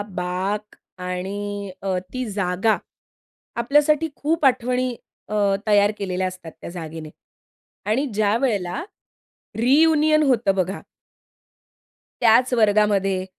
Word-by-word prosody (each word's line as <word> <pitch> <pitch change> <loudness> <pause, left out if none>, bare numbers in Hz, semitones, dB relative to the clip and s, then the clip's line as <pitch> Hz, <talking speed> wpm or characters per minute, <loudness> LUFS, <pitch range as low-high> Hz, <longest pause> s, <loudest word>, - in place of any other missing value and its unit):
बाक 190 +4 -3 0.3
आणि 200 +2 -4
अ, 190 -1 -1 0.2
ती 255 0 -2
जागा 195 +2 +1 0.8
आपल्यासाठी 295 +5 +3
खूप 315 0 0
आठवणी 250 -1 +1 0.3
अ, 215 - -3 0.3
तयार 205 0 +4
केलेल्या 185 -1 -2
असतात 180 -3 -9
त्या - - -7
जागेने. 160 -2 -7 0.8
आणि 260 +7 +1
ज्यावेळेला 205 - 0 0.8
रियुनियन 305 +5 +4
होतं 240 -8 +2
बघा. 190 0 -1 1.4
त्याच 240 +2 +4
वर्गामध्ये 205 -4 +2
210 Hz, 95 wpm, -22 LUFS, 185-255 Hz, 1.4 s, तयार